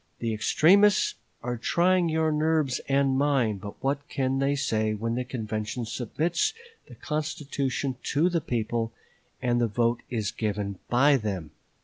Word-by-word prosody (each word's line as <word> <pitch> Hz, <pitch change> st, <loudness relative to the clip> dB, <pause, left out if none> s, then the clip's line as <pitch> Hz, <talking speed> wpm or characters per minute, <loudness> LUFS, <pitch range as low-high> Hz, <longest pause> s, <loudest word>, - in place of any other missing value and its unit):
The 115 Hz, -1 st, -2 dB
extremists 200 Hz, -, +4 dB, 0.3 s
are 120 Hz, 0 st, -2 dB
trying 175 Hz, +5 st, +2 dB
your 160 Hz, 0 st, +1 dB
nerves 155 Hz, -3 st, +1 dB
and 135 Hz, -1 st, +3 dB
mine, 135 Hz, -7 st, +2 dB
but 100 Hz, +1 st, -9 dB
what 140 Hz, +1 st, -1 dB
can 135 Hz, -1 st, 0 dB
they 140 Hz, +1 st, +2 dB
say 110 Hz, -6 st, 0 dB
when 115 Hz, +2 st, -2 dB
the 125 Hz, +2 st, -1 dB
convention 110 Hz, -1 st, -4 dB
submits 165 Hz, -, -1 dB, 0.3 s
the -, -, -12 dB
constitution 145 Hz, -3 st, -2 dB, 0.2 s
to 155 Hz, +5 st, +3 dB
the 170 Hz, -2 st, 0 dB
people 115 Hz, -2 st, -2 dB, 0.5 s
and 120 Hz, -1 st, +2 dB
the 120 Hz, -, +3 dB
vote 115 Hz, +2 st, +1 dB
is 110 Hz, -5 st, -2 dB
given 100 Hz, -3 st, -3 dB
by 140 Hz, +4 st, +5 dB
them? 95 Hz, -, -4 dB
130 Hz, 145 wpm, -27 LUFS, 115-150 Hz, 0.5 s, by